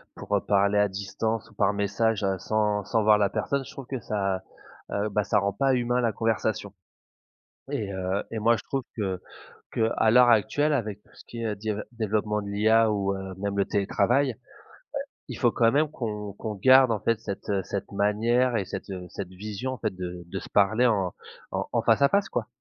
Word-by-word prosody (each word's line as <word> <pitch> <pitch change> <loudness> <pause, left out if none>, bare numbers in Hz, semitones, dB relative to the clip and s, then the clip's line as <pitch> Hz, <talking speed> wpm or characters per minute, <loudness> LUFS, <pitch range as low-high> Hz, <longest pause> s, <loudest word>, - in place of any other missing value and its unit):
pour 105 - -2
heu, 100 - +2
parler 100 0 +3
à 105 -1 +4
distance 100 +4 -3
ou - - -20
par 105 0 +2
message 100 +2 0
heu, 95 -1 +1
sans 105 +1 0
sans 110 +3 +1
voir 105 0 +6
la 100 -1 +2
personne, 140 +7 -1
je 140 - -10
trouve 135 -4 -9
que 130 -2 -3
ça, 95 -3 -1 0.5
heu, 100 +1 -1
bah 105 0 0
ça 100 - +2
rend 100 0 -1
pas 135 +6 +2
humain 125 0 +1
la 115 -2 +2
conversation. 110 -2 -1 1.0
Et 100 -2 -2
heu, 95 +1 -2
et 110 - -2
moi 115 +2 +4
je - - -8
trouve 135 -1 -2
que 95 -5 -2 0.5
qu'à 110 0 +2
l'heure 125 0 +7
actuelle, 135 +7 +3
avec 105 -7 -2
tout - - -27
ce - - -15
qui 115 -1 -7
est 110 -2 -2
di 110 +2 -4
heu, 105 0 -2
développement 105 -2 -1
de 100 - -7
l'IA 110 +2 +3
ou 100 -1 0
heu, 95 -1 -6
même 100 0 -2
le 100 - +3
télétravail, 110 +7 +1
heu, - - -16 0.9
il - - -6
faut - - +3
quand 115 0 +3
même 150 +2 +2
qu'on 105 -7 -4
qu'on 105 +1 -5
garde, 130 +5 +6
en 110 - 0
fait, 115 +1 0
cette 100 -2 -6
heu, 100 -1 +1
cette 100 +2 -5
manière 115 +5 +2
et 100 - -1
cette 95 +2 -7
heu, 90 -2 -6
cette 95 -3 -6
vision, 105 +7 -5
en - - -6
fait, 95 - -3
de 90 -1 -6
de 95 +3 -5
se - - -11
parler 110 +5 +4
en 95 -6 +1 0.4
en - - -2
en - - +1
face - - +3
à 140 - +6
face, 200 0 +2
quoi. 115 -3 -3
105 Hz, 220 wpm, -26 LUFS, 100-115 Hz, 1.0 s, l'heure